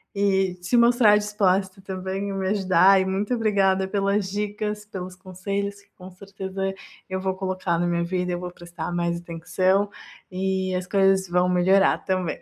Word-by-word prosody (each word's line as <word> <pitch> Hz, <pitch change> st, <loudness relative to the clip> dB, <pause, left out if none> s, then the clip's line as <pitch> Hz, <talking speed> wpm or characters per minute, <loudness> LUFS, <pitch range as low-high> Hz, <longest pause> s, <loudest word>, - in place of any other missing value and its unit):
e 190 Hz, -2 st, +1 dB
se 180 Hz, +8 st, +1 dB
mostrar 235 Hz, -3 st, +5 dB
disposta 195 Hz, -2 st, 0 dB
também 190 Hz, +1 st, -4 dB
e -, -, -3 dB
me 190 Hz, -1 st, -2 dB
ajudar, 190 Hz, -1 st, +4 dB
e -, -, -1 dB
muito 195 Hz, +5 st, -1 dB
obrigada 195 Hz, -4 st, +2 dB
pelas 200 Hz, 0 st, 0 dB
dicas, 210 Hz, +1 st, -3 dB
pelos 185 Hz, -3 st, -7 dB
conselhos 200 Hz, +2 st, -4 dB
que 200 Hz, -, -29 dB
com 185 Hz, 0 st, -11 dB
certeza 195 Hz, 0 st, -5 dB, 0.4 s
eu 190 Hz, 0 st, -2 dB
vou 190 Hz, 0 st, -1 dB
colocar 185 Hz, -2 st, -2 dB
na 175 Hz, -, +1 dB
minha 170 Hz, 0 st, 0 dB
vida, 180 Hz, +1 st, -2 dB
eu 175 Hz, -, -3 dB
vou 180 Hz, 0 st, -6 dB
prestar 175 Hz, 0 st, -7 dB
mais 170 Hz, 0 st, -1 dB
atenção 185 Hz, +4 st, 0 dB, 0.4 s
e 190 Hz, 0 st, -1 dB
as 180 Hz, 0 st, -2 dB
coisas 195 Hz, -1 st, +3 dB
vão 180 Hz, +1 st, +2 dB
melhorar 190 Hz, +2 st, +3 dB
também. 185 Hz, -3 st, -1 dB
190 Hz, 170 wpm, -24 LUFS, 185-200 Hz, 0.4 s, mostrar